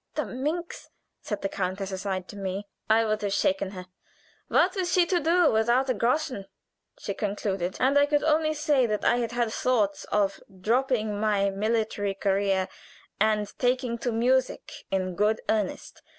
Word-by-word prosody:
"The 305 Hz, -, -1 dB
minx!" 300 Hz, -, -4 dB, 0.3 s
said 210 Hz, -3 st, -5 dB
the -, -, +1 dB
countess 190 Hz, +1 st, -3 dB
aside 190 Hz, -1 st, -3 dB
to -, -, -9 dB
me. 195 Hz, 0 st, -4 dB, 0.2 s
"I 225 Hz, +1 st, +4 dB
would 215 Hz, 0 st, -1 dB
have 200 Hz, -1 st, -1 dB
shaken 195 Hz, -1 st, +1 dB
her!" 185 Hz, -2 st, -8 dB, 0.6 s
"'What -, -, +3 dB
was 365 Hz, -3 st, -1 dB
she 360 Hz, -1 st, +4 dB
to 350 Hz, +1 st, +1 dB
do 335 Hz, 0 st, +3 dB
without 235 Hz, +4 st, +2 dB
a -, -, +2 dB
groschen?' 250 Hz, -5 st, -1 dB, 0.5 s
she 200 Hz, -, -4 dB
concluded, 195 Hz, -3 st, -2 dB
and 270 Hz, +2 st, +3 dB
I 285 Hz, -, +4 dB
could 290 Hz, 0 st, +1 dB
only 310 Hz, 0 st, +2 dB
say 295 Hz, -5 st, +2 dB
that 210 Hz, -1 st, -2 dB
I 240 Hz, -, +4 dB
had 235 Hz, -1 st, -2 dB
had 240 Hz, -2 st, 0 dB
thoughts 215 Hz, -6 st, 0 dB
of 200 Hz, -2 st, 0 dB, 0.2 s
dropping 220 Hz, -1 st, 0 dB
my 205 Hz, -2 st, +2 dB
military 210 Hz, -1 st, -1 dB
career 195 Hz, -1 st, +1 dB, 0.5 s
and 210 Hz, -1 st, +1 dB
taking 250 Hz, -1 st, 0 dB
to 240 Hz, +1 st, -1 dB
music 255 Hz, +3 st, +1 dB, 0.2 s
in 185 Hz, -1 st, -1 dB
good 210 Hz, +4 st, +1 dB
earnest. 215 Hz, -3 st, -2 dB
220 Hz, 165 wpm, -27 LUFS, 200-255 Hz, 0.6 s, I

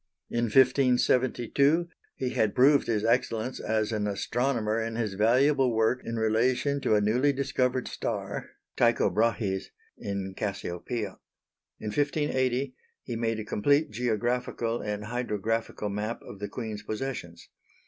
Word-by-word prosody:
In 120 Hz, 0 st, +1 dB
1572 130 Hz, +4 st, +3 dB, 0.3 s
he 130 Hz, -, -2 dB
had 110 Hz, -5 st, +1 dB
proved 140 Hz, +3 st, +5 dB
his 110 Hz, -2 st, 0 dB
excellence 115 Hz, +1 st, 0 dB
as 110 Hz, 0 st, 0 dB
an 105 Hz, -2 st, -1 dB
astronomer 115 Hz, +2 st, 0 dB
in 115 Hz, 0 st, -3 dB
his 110 Hz, -4 st, -1 dB
valuable 125 Hz, +4 st, +3 dB
work 115 Hz, +3 st, +2 dB
in 115 Hz, -, -4 dB
relation 125 Hz, +6 st, +1 dB
to 110 Hz, -, +2 dB
a 105 Hz, -, +3 dB
newly 125 Hz, +7 st, +3 dB
discovered 130 Hz, -2 st, 0 dB
star -, -, -4 dB, 0.3 s
(Tycho -, -, +3 dB
Brahe's) 105 Hz, -2 st, 0 dB, 0.3 s
in 100 Hz, -1 st, -4 dB
Cassiopœia. 100 Hz, +2 st, -4 dB, 0.6 s
In 105 Hz, -, -4 dB
1580 130 Hz, -1 st, 0 dB, 0.3 s
he 120 Hz, -, -5 dB
made 115 Hz, -1 st, -1 dB
a -, -, -3 dB
complete 140 Hz, +7 st, +2 dB
geographical 120 Hz, +1 st, -1 dB
and 105 Hz, 0 st, -3 dB
hydrographical 115 Hz, -2 st, -2 dB
map 105 Hz, +3 st, -3 dB
of 100 Hz, -, -10 dB
the 105 Hz, -, -4 dB
Queen's 110 Hz, -4 st, -5 dB
possessions. 105 Hz, -7 st, -5 dB
115 Hz, 130 wpm, -28 LUFS, 105-130 Hz, 0.6 s, proved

